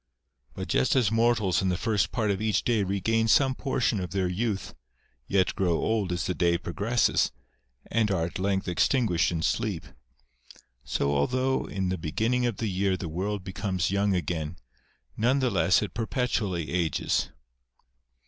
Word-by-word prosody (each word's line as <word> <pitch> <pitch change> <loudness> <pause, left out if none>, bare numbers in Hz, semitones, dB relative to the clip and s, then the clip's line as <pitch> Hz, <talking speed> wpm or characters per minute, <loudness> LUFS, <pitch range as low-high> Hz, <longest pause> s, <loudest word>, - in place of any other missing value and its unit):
But - - -5
just 65 - +2
as 120 -6 +3
mortals 115 -5 +2
in 95 - +1
the 90 - 0
first 110 0 0
part 110 -4 0
of 100 - -2
each 110 -4 +1
day 115 -3 +2
regain 100 +4 +1
some 135 +4 +4
portion 130 -5 0
of 90 -1 -4
their 95 -1 0
youth, 100 +1 -2 0.5
yet 95 -2 +2
grow 90 -3 +1
old 110 -5 0
as 85 -2 -1
the 90 - -1
day 85 -1 +2
progresses, 105 +8 +1 0.5
and 115 -2 +1
are 90 -4 +1
at 85 - -6
length 95 0 0
extinguished 90 0 +2
in 80 -1 -2
sleep; 100 -5 -1 1.0
so 70 +2 0
although 130 - +1
in 95 -2 -2
the 95 - -2
beginning 115 +10 0
of 115 -5 -3
the 115 - -2
year 95 -1 0
the 90 - -5
world 95 +4 -3
becomes 95 -2 -2
young 100 0 +2
again, 85 -2 -3 0.6
none 125 +5 +2
the 130 -3 +1
less 95 -5 +3
it - - -5
perpetually 110 - -1
ages. 85 -4 0
100 Hz, 165 wpm, -27 LUFS, 90-115 Hz, 1.0 s, some